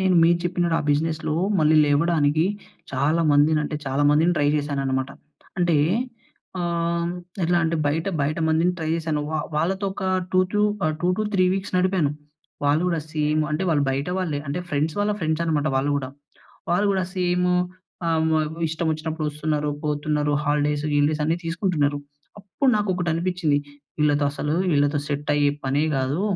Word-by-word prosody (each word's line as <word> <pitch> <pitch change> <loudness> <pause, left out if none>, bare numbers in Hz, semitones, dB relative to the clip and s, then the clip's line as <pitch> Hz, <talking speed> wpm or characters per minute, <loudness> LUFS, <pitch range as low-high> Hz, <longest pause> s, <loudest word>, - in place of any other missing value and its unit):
నేను 190 -1 +2
మీరు 170 +1 +4
చెప్పినట్టు 175 -1 0
ఆ - - -3
బిజినెస్‌లో 155 +1 0 0.2
మళ్ళీ 155 0 +4
లేవడానికి 150 +1 +2 0.5
చాలా 145 +5 +1
మందిని 150 +2 +4
అంటే, 150 - -3
చాలా 135 +2 0
మందిని 160 +4 +3
ట్రై 145 -1 +3
చేశాననమాట. 135 -2 -1 0.5
అంటే 175 -3 +3 0.8
ఆహ్, 170 0 -1 0.3
ఎలా 175 +1 +2
అంటే 165 +1 0
బయట, 160 +4 0
బయట 145 +3 0
మందిని 165 +3 +2
ట్రై 160 -1 -3
చేశాను. 160 -2 -2
వా 155 - -1 0.2
వాళ్ళతో 190 +6 0
ఒక 195 0 -6 0.3
టూ 185 - +5
టు 210 - +1 0.2
ఆహ్, 155 0 +1
2-3 190 +2 +1
వీక్స్ 195 0 -4
నడిపాను. 180 -5 +2 0.5
వాళ్ళు 145 +3 +3
కూడా 170 -2 0
సేమ్. 150 0 +1
అంటే, 150 +4 -1
వాళ్ళు 150 -4 +2
బయట 140 +3 -2
వాళ్ళే. 165 -6 -1
అంటే, 145 - -2
ఫ్రెండ్స్ 150 +2 0
వాళ్ళ 205 +1 +1
ఫ్రెండ్స్ 160 -1 0
అన్నమాట 155 -2 0
వాళ్ళు 135 +2 +1
గూడా. 135 -2 -3 0.6
వాళ్ళు 180 +4 +2
గూడా 190 -1 0
సేము 180 0 +1 0.5
ఆహ్, 165 -1 +2
హ్మ్ 160 +1 -1
ఇష్టం 160 +1 -2
వచ్చినప్పుడు 155 0 -3
వస్తున్నారు, 150 0 -1
పోతున్నారు 150 0 0
హాలిడేస్, 150 0 0
గీలిడేస్ 145 +1 +2
అన్ని 165 +2 +1
తీసుకుంటున్నారు. 165 -4 0 0.4
అప్పుడు 205 +8 0
నాకు 210 -1 -1
ఒకటి 180 -1 -1
అనిపించింది. 170 -3 0 0.4
వీళ్ళతో 145 -1 +2
అసలు, 150 +1 -2 0.2
వీళ్ళతో 145 0 +2
సెట్ 145 0 -3
అయ్యే 145 -1 +3 0.2
పనే 140 +3 +1
కాదు. 135 +6 -1
155 Hz, 160 wpm, -23 LUFS, 145-175 Hz, 0.8 s, టూ